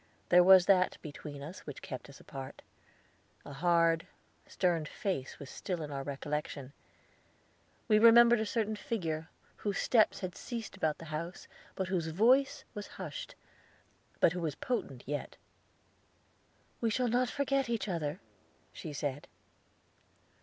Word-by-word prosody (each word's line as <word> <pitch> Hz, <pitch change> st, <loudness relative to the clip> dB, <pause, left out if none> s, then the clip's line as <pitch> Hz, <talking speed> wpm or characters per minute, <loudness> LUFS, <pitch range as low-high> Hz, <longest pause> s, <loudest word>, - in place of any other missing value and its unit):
There 180 Hz, 0 st, +7 dB
was 185 Hz, -1 st, +8 dB
that 185 Hz, -2 st, +4 dB
between 145 Hz, -2 st, -8 dB
us 165 Hz, +6 st, -8 dB
which 145 Hz, -, -8 dB
kept 130 Hz, -, -7 dB
us 140 Hz, -, -13 dB
apart. 135 Hz, -2 st, -9 dB, 0.8 s
A 145 Hz, -, -8 dB
hard, 165 Hz, +1 st, +3 dB, 0.4 s
stern 170 Hz, -4 st, +1 dB
face 155 Hz, -5 st, -3 dB
was 140 Hz, -, -9 dB
still 175 Hz, +2 st, -4 dB
in 150 Hz, -, -6 dB
our 140 Hz, -1 st, -3 dB
recollection. 140 Hz, 0 st, -4 dB, 1.1 s
We 215 Hz, -1 st, +5 dB
remembered 235 Hz, +1 st, +8 dB
a 220 Hz, -, 0 dB
certain 215 Hz, 0 st, 0 dB
figure, 165 Hz, -7 st, -3 dB, 0.3 s
whose 205 Hz, -2 st, -2 dB
steps 220 Hz, -4 st, +3 dB
had 185 Hz, -1 st, -4 dB
ceased 230 Hz, -5 st, -6 dB
about 155 Hz, -5 st, 0 dB
the 165 Hz, -, -10 dB
house, 170 Hz, +4 st, -5 dB, 0.3 s
whose 185 Hz, -3 st, -1 dB
voice 240 Hz, -, +3 dB
was 205 Hz, -3 st, -6 dB
hushed, -, -, -6 dB, 0.8 s
but -, -, +5 dB
who 180 Hz, -, -3 dB
was 160 Hz, -3 st, -2 dB
potent 235 Hz, -, -3 dB
yet. 145 Hz, +1 st, -4 dB, 1.4 s
"We 230 Hz, -, +1 dB
shall 250 Hz, +3 st, +1 dB
not 245 Hz, +2 st, +2 dB
forget 275 Hz, -2 st, 0 dB
each 230 Hz, -2 st, -1 dB
other," 165 Hz, -3 st, -2 dB, 0.5 s
she 155 Hz, -4 st, -7 dB
said. 145 Hz, -1 st, -3 dB
180 Hz, 140 wpm, -32 LUFS, 150-220 Hz, 1.4 s, was